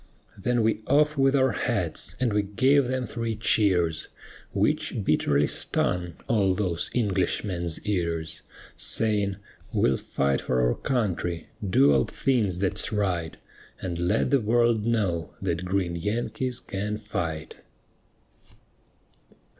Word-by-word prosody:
Then 120 +3 0
we 110 -1 +1
off 150 +1 +3
with 135 0 +3
our 130 -2 +3
hats, 95 - -2
and 125 -4 +1
we 105 - +3
gave 130 +7 +3
them 130 0 -1
three 115 -2 -3
cheers, 100 -6 +1 0.4
Which - - 0
bitterly 70 0 +2
stung 90 +3 0
all 100 -5 +2
those 90 -5 -1
Englishmen's 95 -6 0
ears; 85 -5 -2 0.3
Saying, 105 -3 0 0.4
"We'll 65 - +2
fight 70 0 0
for 65 - 0
our - - +2
country, 90 -9 -2
do 70 -7 +4
all 65 -2 +3
things 110 -9 0
that's 100 +2 -1
right, 90 -6 -1 0.4
And 85 -2 -4
let 85 +1 +1
the 140 -3 +4
world 115 0 +2
know, 95 -9 0
that 90 -2 -2
green 90 -2 -1
Yankees 115 +6 -2
can 105 -2 -4
fight." 80 -7 -4
100 Hz, 125 wpm, -26 LUFS, 85-115 Hz, 0.4 s, do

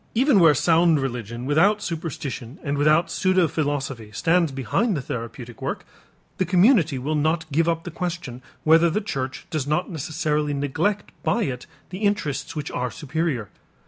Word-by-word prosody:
Even 255 -2 +4
where 165 -4 +6
sound 165 +2 +4
religion 120 -2 -4
without 175 +9 +3
superstition 155 - -5
and 145 -2 -1
without 155 +4 +3
pseudophilosophy 145 - 0
stands 170 - +2
behind 135 - 0
the - - -2
therapeutic 120 -1 -7
work, - - -3 0.5
the - - +3
community 180 - +4
will 140 +5 -2
not 160 +2 +1
give 165 +4 +2
up 165 0 -1
the 175 - -6
question 170 -8 -5 0.2
whether 165 +2 +5
the 175 - 0
church 135 -11 -4
does 155 -4 -2
not 155 +6 0
necessarily 150 -1 -1
neglect 160 +9 -1
by 230 +2 +1
it 125 -8 -4 0.2
the 185 - -6
interests 185 -11 -1
which 150 -2 -4
are 125 0 -2
superior. 150 - -2
155 Hz, 155 wpm, -23 LUFS, 135-175 Hz, 0.5 s, where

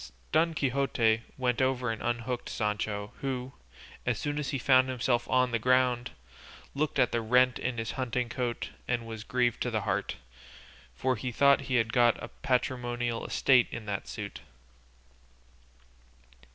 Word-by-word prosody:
Don 165 +1 +3
Quixote 125 -5 +1 0.2
went 125 -1 0
over 130 -2 +1
and 110 - -5
unhooked 120 +1 -2
Sancho, 105 -1 -2
who, 130 -1 -3 0.5
as - - 0
soon 145 0 -2
as 140 -2 -3
he 140 - -1
found 130 0 +4
himself 120 -1 0
on 125 -1 +3
the 115 - +1
ground, 125 0 +2 0.6
looked 150 0 -1
at 130 -3 +3
the 115 - 0
rent 125 +2 +3
in 125 -2 -2
his 115 0 -2
huntingcoat 125 -1 -2 0.2
and 120 -2 -1
was 110 -1 -7
grieved 120 -1 0
to 125 - 0
the 110 -3 -1
heart, - - -1 0.8
for 130 -1 0
he 125 +4 -3
thought 140 +3 +5
he 130 - +1
had 115 -2 +1
got 120 -2 +4
a - - -8
patrimonial 120 -2 -1
estate 130 -3 +4
in 120 -2 -7
that 100 -2 -4
suit. - - -6
125 Hz, 150 wpm, -29 LUFS, 115-130 Hz, 0.8 s, thought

